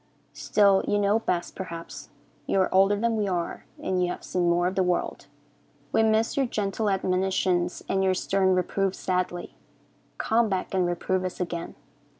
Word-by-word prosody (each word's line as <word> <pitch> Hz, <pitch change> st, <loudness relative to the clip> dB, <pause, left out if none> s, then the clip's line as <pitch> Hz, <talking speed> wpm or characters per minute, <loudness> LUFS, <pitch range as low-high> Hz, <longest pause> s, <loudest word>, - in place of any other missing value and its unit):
Still, 200 Hz, -2 st, +3 dB
you 205 Hz, -, +2 dB
know 205 Hz, +2 st, +2 dB
best, 175 Hz, -6 st, -2 dB
perhaps. 170 Hz, -3 st, -7 dB, 0.4 s
You 195 Hz, -, +2 dB
are 185 Hz, -, 0 dB
older 195 Hz, +2 st, +5 dB
than 225 Hz, +2 st, 0 dB
we 210 Hz, -2 st, 0 dB
are, 175 Hz, -3 st, -3 dB
and 185 Hz, -1 st, -1 dB
you 175 Hz, -, 0 dB
have -, -, -5 dB
seen 175 Hz, -1 st, 0 dB
more 175 Hz, +1 st, +2 dB
of 185 Hz, -, 0 dB
the 190 Hz, -, +1 dB
world. 180 Hz, -1 st, -1 dB, 0.6 s
We -, -, +3 dB
miss 220 Hz, 0 st, +2 dB
your 270 Hz, -2 st, +1 dB
gentle 210 Hz, -1 st, -1 dB
admonitions 185 Hz, -2 st, 0 dB
and 190 Hz, 0 st, +1 dB
your 190 Hz, -1 st, +2 dB
stern 190 Hz, 0 st, +2 dB
reproofs 190 Hz, +1 st, 0 dB
sadly. 180 Hz, -1 st, -2 dB, 0.6 s
Come 225 Hz, 0 st, +2 dB
back 190 Hz, -1 st, -2 dB
and 185 Hz, -2 st, +2 dB
reprove 185 Hz, +2 st, -1 dB
us 185 Hz, -1 st, -4 dB
again. 170 Hz, -2 st, -4 dB
190 Hz, 170 wpm, -26 LUFS, 180-200 Hz, 0.6 s, older